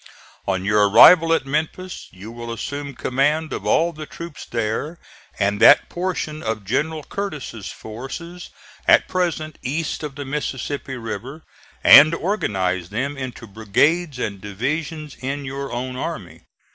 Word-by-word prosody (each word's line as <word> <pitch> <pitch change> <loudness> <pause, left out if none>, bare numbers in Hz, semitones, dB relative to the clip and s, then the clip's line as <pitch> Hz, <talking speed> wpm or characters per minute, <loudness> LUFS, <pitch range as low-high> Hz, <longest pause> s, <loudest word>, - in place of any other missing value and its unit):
On 95 -1 -1
your 105 0 +4
arrival 165 - +8
at 165 - +2
Memphis 160 +6 -3
you 100 +4 -11
will 120 0 -7
assume 140 +4 -5
command 150 +6 0
of - - -5
all 170 +1 +3
the 155 -1 -8
troops 170 -3 -9
there, 115 +8 -2 0.4
and 100 0 0
that 145 - +7
portion 175 -4 -3
of 110 -2 -3
General 155 +8 -1
Curtis's 150 - -5
forces 135 +11 -8 0.4
at - - +6
present 165 -4 -2
east 155 +5 -3
of 150 -3 -6
the 145 0 -6
Mississippi 135 -1 -4
River, 120 +7 -6 0.4
and 155 +3 +9
organize 95 - -1
them 130 +8 -2
into 130 -3 -6
brigades 130 - +1
and 100 -5 -4
divisions 150 - -4
in 140 +2 -3
your 135 +1 -5
own 125 +1 -4
army. - - -6
140 Hz, 140 wpm, -21 LUFS, 110-155 Hz, 0.4 s, and